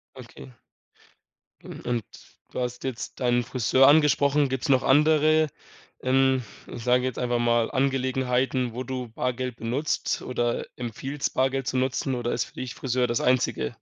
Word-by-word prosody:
Okay. 130 +1 -12 1.1
Mhm, - - -9
und 120 -4 -1 0.5
du - - -4
hast 125 0 -4
jetzt 130 -1 -5
deinen 120 -1 +2
Friseur 130 +1 +3
angesprochen. 145 -1 +4
Gibt's 130 +3 -3
noch 130 -1 +4
andere, 155 +2 +4 0.5
ähm, 130 0 +3 0.3
ich 120 - -8
sage 125 +1 +3
jetzt 130 - -3
einfach 120 -1 0
mal, 120 -1 +2
Angelegenheiten, 130 -2 0
wo 125 - -3
du 130 -1 -5
Bargeld 125 +1 -3
benutzt 130 +7 -2
oder 120 -1 -2
empfiehlst, 135 +4 -4
Bargeld 130 0 0
zu 130 - -1
nutzen 130 +1 0
oder 120 -1 -2
ist - - 0
für - - -17
dich 130 -2 -6
Friseur 125 -1 0
das 120 0 -1
Einzige? 125 - +1
130 Hz, 150 wpm, -25 LUFS, 120-135 Hz, 1.1 s, angesprochen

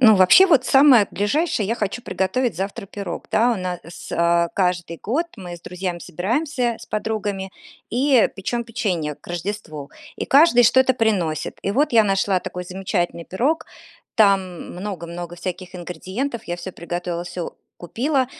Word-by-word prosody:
Ну, 220 -4 +8
вообще, 190 - +7
вот 290 -9 +4
самое 265 -7 +6
ближайшее- 215 - 0
я 225 - 0
хочу 215 +2 -3
приготовить 190 +3 -1
завтра 195 +1 -4
пирог. 195 -3 -6
Да, 240 +2 +4
у 230 - -1
нас, 180 -1 -3 0.3
э, 170 0 +2
каждый 175 -3 0
год 300 +11 0
мы 180 -4 -7
с - - -17
друзьями 180 0 -4
собираемся, 240 - -1
с - - -12
подругами, 205 -3 -3 0.4
и 260 0 +4
печем 235 +5 -2
печенье 185 - -2
к - - -22
Рождеству, 175 -5 -5 0.3
и - - -3
каждый 275 -4 +6
что-то 260 +2 +5
приносит. 180 -9 0
И 200 - -1
вот 280 +4 +2
я 225 -2 +6
нашла 195 -1 +2
такой 180 - -6
замечательный 180 -2 -2
пирог, 265 - 0 0.5
там 195 -5 +2
много 180 -2 -5
много 175 0 -7
всяких 180 +1 -6
ингредиентов. 185 - -4
Я 175 0 -4
всё 175 +2 -7
приготовила, 175 0 -4
всё 175 -1 -5 0.2
купила, 260 - 0
195 Hz, 155 wpm, -22 LUFS, 175-235 Hz, 0.5 s, Ну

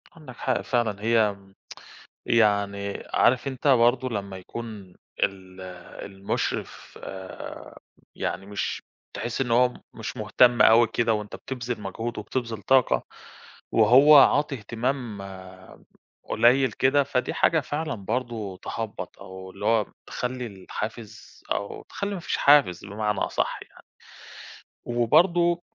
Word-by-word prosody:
عندك 150 -6 -12
حق 130 -2 0
فعلًا، 110 -5 -1
هي 110 -3 +3 0.9
يعني 100 -3 +1
عارف 130 +2 +3
أنت 135 +1 -3
برضه 125 0 +4
لمّا 100 -3 -4
يكون 105 -2 -9 0.3
ال 95 -1 -4 0.4
المُشرف 100 0 -4 1.2
يعني 95 - -3
مش 105 0 -4 0.3
تحِس 120 +2 -3
إن 120 -3 -1
هو 125 +1 +4 0.2
مش 110 -1 -6
مهتم 120 +3 +4
أوي 115 +1 +7
كده 115 0 +1
وأنت 105 -1 -4
بتبذِل 120 -4 -5
مجهود 115 +4 -5
وبتبذِل 115 -1 -4
طاقة 130 +2 +3 0.7
وهو 145 +4 +7
عاطي 145 +1 +5
اهتمام 120 -1 -3 1.0
قليّل 125 +1 +3
كده، 135 +5 +3
فدي 135 -2 -1
حاجة 160 - +3
فعلًا 150 +2 -3
برضه 110 -2 -4
تهبَّط 115 -2 -6
أو 95 -1 -10
اللي 105 - -8
هو 115 -2 +3 0.2
تخلّي 125 0 -4
الحافز 110 +2 -8
أو 100 - -3
تخلّي 200 0 -4
ما - - -5
فيش - - -2
حافز 140 -13 +4
بمعنى 105 +1 -2
أصح - - -1
يعني. - - -15 1.0
وبرضه 170 +9 +3
115 Hz, 115 wpm, -25 LUFS, 105-130 Hz, 1.2 s, أوي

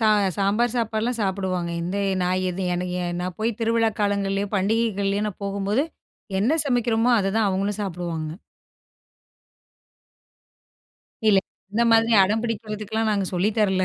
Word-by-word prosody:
ச 210 -2 +4
சாம்பார் 215 +5 +1
சாப்பாடுலாம் 230 +1 -1
சாப்பிடுவாங்க. 185 -3 -1
இந்த 180 +4 -3 0.3
நான் 185 +1 +1
இது 185 +1 -3
எனக் 180 0 -3 0.3
நா 180 - -2
போய் 220 0 -1
திருவிழா 225 0 +2
காலங்கள்லேயோ, 200 -1 0
பண்டிகைகள்லேயோ 205 0 +1
நான் 205 - -9
போகும்போது 200 +7 0 0.6
என்ன 285 +10 +2
சமைக்கிறோமோ, 240 -2 +2
அதுதான் 205 +2 +1
அவங்களும் 200 +2 -1
சாப்பிடுவாங்க. 170 -4 -4 3.0
இல்ல 200 -2 +6 0.3
இந்த 230 +3 +2
மாதிரி 225 +1 +4
அடம் 215 +4 0
பிடிக்கிறதுக்குலாம் 220 -1 -2
நாங்க 200 -2 +1
சொல்லி 185 +4 +2
தரல. 190 -3 +2
205 Hz, 120 wpm, -24 LUFS, 190-225 Hz, 3.0 s, இல்ல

